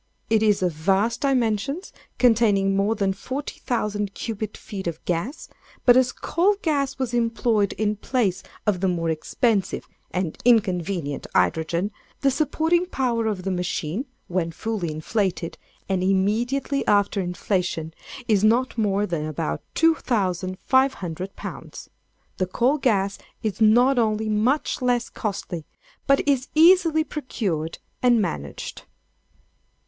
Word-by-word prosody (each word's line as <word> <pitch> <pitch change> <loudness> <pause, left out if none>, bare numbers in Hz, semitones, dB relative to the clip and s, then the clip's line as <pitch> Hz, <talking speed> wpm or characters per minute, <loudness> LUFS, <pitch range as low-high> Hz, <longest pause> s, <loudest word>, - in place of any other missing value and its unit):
It 220 -1 +4
is 210 -3 +3
of 180 - +2
vast 195 +8 +1
dimensions, 270 - 0 0.2
containing 210 -5 +3
more 200 +3 +2
than 195 -3 0
40,000 210 -4 -3
cubic 215 -2 -4
feet 195 -3 -7
of 165 -2 -5
gas; 180 - -2 0.4
but 245 - +8
as 255 -1 +4
coal 380 +5 +1
gas 285 -4 0
was 260 -3 -2
employed 230 -3 +1
in 210 0 -1
place 210 -5 0 0.2
of 205 -4 +1
the 190 - +1
more 165 -2 0
expensive 200 - 0 0.2
and 180 -3 -3
inconvenient 185 - +1
hydrogen, 170 +5 +1 0.3
the 275 - +3
supporting 320 +5 +1
power 240 -8 0
of 200 -4 -2
the 195 - -1
machine, 180 - -2 0.2
when 170 -2 -1
fully 195 -2 -3
inflated, 175 +2 -2 0.3
and 190 -2 0
immediately 230 +9 +1
after 205 -1 +3
inflation, 180 -3 -2 0.3
is 210 -3 +3
not 235 +3 +2
more 205 -1 +1
than 165 -5 -2
about 75 - -3
2500 195 - +1
pounds. - - -8 0.5
The 185 - 0
coal 250 +10 +1
gas 200 -6 +1 0.2
is 215 0 -2
not 245 +4 +5
only 215 -1 +1
much 240 +8 +1
less 245 -1 +1
costly, 185 -6 -4 0.4
but 275 +1 +3
is 270 -2 +2
easily 330 -1 +6
procured 195 - -3 0.2
and 245 -2 +4
managed. 70 - -4
210 Hz, 125 wpm, -24 LUFS, 185-250 Hz, 0.5 s, but